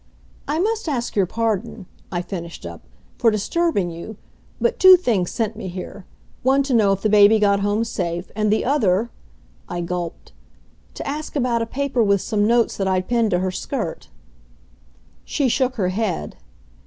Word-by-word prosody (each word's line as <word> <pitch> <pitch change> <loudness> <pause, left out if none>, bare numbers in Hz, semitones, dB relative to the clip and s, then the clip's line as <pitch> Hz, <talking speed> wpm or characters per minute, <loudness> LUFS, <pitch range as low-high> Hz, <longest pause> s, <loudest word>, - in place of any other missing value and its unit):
"I 300 - -1
must 430 0 0
ask 245 -5 -2
your 195 -3 +2
pardon," 225 -2 -2 0.3
I 175 -1 -2
finished 170 - -7
up, 85 -1 -8 0.4
"for 230 - +5
disturbing 215 - 0
you, 170 +6 -8 0.4
but 475 - 0
two 375 -1 +9
things 215 - 0
sent 225 -2 -2
me 210 - -6
here 185 +1 -8 0.3
one 270 +2 +3
to 275 -1 -2
know 215 -4 +4
if 195 0 -1
the - - +3
baby 210 +1 +6
got 200 -1 +3
home 205 +2 +1
safe, 175 -5 -4
and 215 0 +1
the 215 - +1
other," 230 -5 +1 0.6
I 175 - -3
gulped, 175 -1 -5 0.6
"to - - -6
ask 300 +3 -5
about 245 -4 +1
a 230 - -2
paper 270 0 -1
with 200 -3 +3
some 210 -1 0
notes 235 0 +2
that 195 - -1
I'd 185 -1 0
pinned 235 -2 +2
to 180 - +1
her 185 0 -1
skirt." 210 -2 -4 1.1
She 280 - 0
shook 255 +1 +1
her 190 -6 0
head. 185 - -2
215 Hz, 175 wpm, -21 LUFS, 185-250 Hz, 1.1 s, two